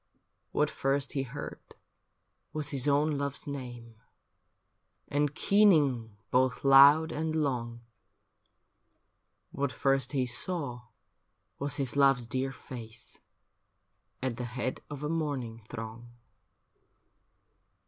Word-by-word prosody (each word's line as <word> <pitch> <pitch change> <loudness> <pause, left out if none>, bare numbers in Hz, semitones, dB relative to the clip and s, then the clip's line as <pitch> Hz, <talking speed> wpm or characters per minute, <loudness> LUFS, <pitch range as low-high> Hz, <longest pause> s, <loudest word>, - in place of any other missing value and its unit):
What - - +1
first 135 +1 0
he 135 - 0
heard 135 +2 -6 0.9
was 150 -2 -2
liis 135 -1 +2
own 145 +1 +2
love's 140 0 -3
name, 120 -5 -7 1.1
And 145 0 0
keening 145 - +3
both 130 0 +2
loud 140 +4 +8
and 160 +1 -2
long, 120 -6 -1 1.7
What 140 -1 -1
first 135 0 +1
he 130 -2 +1
saw 125 -3 -4 0.7
was 140 -1 -1
his 135 -2 -2
love's 135 -3 +4
dear 130 +3 -1
face. 115 -4 -8 1.0
At 125 -3 -1
the 125 - -3
head 125 +1 -3
of 145 0 -7
a - - -1
mourning 140 -8 -2
throng. 115 +2 -7
135 Hz, 105 wpm, -30 LUFS, 120-145 Hz, 1.7 s, loud